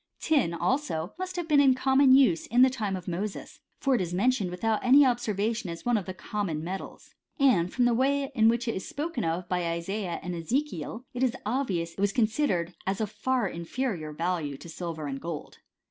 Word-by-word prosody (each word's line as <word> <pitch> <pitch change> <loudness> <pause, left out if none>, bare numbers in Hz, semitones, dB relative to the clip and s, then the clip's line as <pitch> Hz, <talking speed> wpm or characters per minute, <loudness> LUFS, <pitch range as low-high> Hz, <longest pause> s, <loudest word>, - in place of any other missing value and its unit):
Tin, 285 - +2
also, 175 - -1
must 370 0 -4
have 350 -2 -3
been 300 -3 +5
in 270 -2 +5
common 265 +1 +4
use 245 -12 +4
in 245 +3 +5
the 260 - +5
^ime 210 -7 -2
of 180 - -10
Moses; 190 +4 -4 0.2
for 275 - +2
it 245 - +2
is 175 -1 -3
mentioned 210 -1 +1
without 215 +5 -1
any 270 +3 +7
ob 245 -2 +3
servation 220 0 -2
as 170 -1 -7
one 245 0 +2
of 200 -4 -1
the 185 - -4
common 180 -5 -3
metals.* 190 +3 -7 0.3
And 195 -11 +3
from 250 - +2
the 245 - +3
way 275 +3 +1
in 225 -3 +5
which 235 +1 0
it 230 - 0
is 190 - -5
spoken 295 -5 -3
of 170 +2 -2
by 180 -2 -1
Isaiah 170 +2 -3
and 180 - -4
Eze 175 - 0
kiel, 225 - -7
it 245 - -4
is 260 -1 +2
obvious 205 -9 -1
that - - -15
it - - -1
was 200 -1 +2
considered 215 - +1
as 195 0 0
of 215 -2 -2
far 250 0 0
in 170 -2 -6
ferior 175 -7 -3
value 160 -3 -2
to 170 - -11
silver 165 -2 -5
and 135 -1 -4
gold. 165 -3 -6
210 Hz, 225 wpm, -28 LUFS, 170-255 Hz, 0.3 s, any